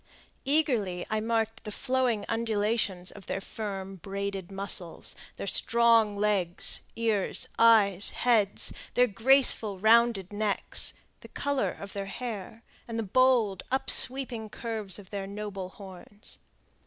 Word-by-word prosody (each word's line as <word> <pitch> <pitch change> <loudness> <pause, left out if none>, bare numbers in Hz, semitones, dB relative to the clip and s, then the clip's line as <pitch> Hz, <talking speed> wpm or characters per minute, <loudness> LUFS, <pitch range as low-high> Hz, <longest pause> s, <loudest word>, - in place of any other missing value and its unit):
Eagerly 245 - +1
I 215 - 0
marked 225 0 -2
the 210 - -7
flowing 250 -3 -1
undulations 210 -4 -1
of 200 - -14
their - - -3
firm, 195 -2 -6
braided 195 0 -5
muscles, 195 -3 -3 0.2
their - - -6
strong 230 0 +2
legs, 200 -4 +3
ears, 220 -4 -1
eyes, 205 -4 +4
heads, 220 -5 +1 0.2
their 250 - +5
graceful 225 -2 +2
rounded 220 -2 +3
necks, 205 -1 +1 0.2
the - - -13
color 285 -1 -2
of 200 -1 -10
their 200 -1 -5
hair, 225 0 -7 0.2
and 230 -1 -5
the 225 - -1
bold, 225 -3 +2
upsweeping 260 -3 +3
curves 215 -4 -3
of 195 -3 -14
their 200 -1 -5
noble 200 -2 -6
horns. 195 +2 -11
210 Hz, 125 wpm, -28 LUFS, 195-230 Hz, 0.2 s, their